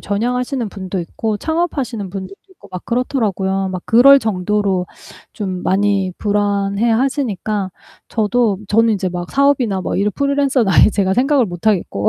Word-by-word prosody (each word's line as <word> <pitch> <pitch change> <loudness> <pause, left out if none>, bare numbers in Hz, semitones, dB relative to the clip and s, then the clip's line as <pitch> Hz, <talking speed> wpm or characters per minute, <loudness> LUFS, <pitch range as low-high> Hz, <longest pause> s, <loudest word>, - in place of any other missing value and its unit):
전향하시는 245 +4 -2
분도 190 -1 -5
있고 210 +5 -3
창업하시는 275 - -2
분들도 195 0 -7 0.2
있고 375 - -18
막 180 - -7
그렇더라고요. 200 -6 -1
막 185 - -4
그럴 275 +5 +7
정도로 200 -3 -1 0.5
좀 185 -4 -4
많이 195 -1 +1
불안해 205 +1 0
하시니까 220 -6 -1 0.4
저도 220 -2 +1
저는 225 +2 +3
이제 190 -2 -2
막 175 0 -6
사업이나 270 -8 +2
막 - - -2
이런 205 +2 +1
프리랜서는 280 -5 +1
아예 200 - +5
제가 195 -2 0
생각을 265 +1 +2
못 175 +2 -8
하겠고 175 - +1
210 Hz, 360 characters per minute, -17 LUFS, 190-245 Hz, 0.5 s, 그럴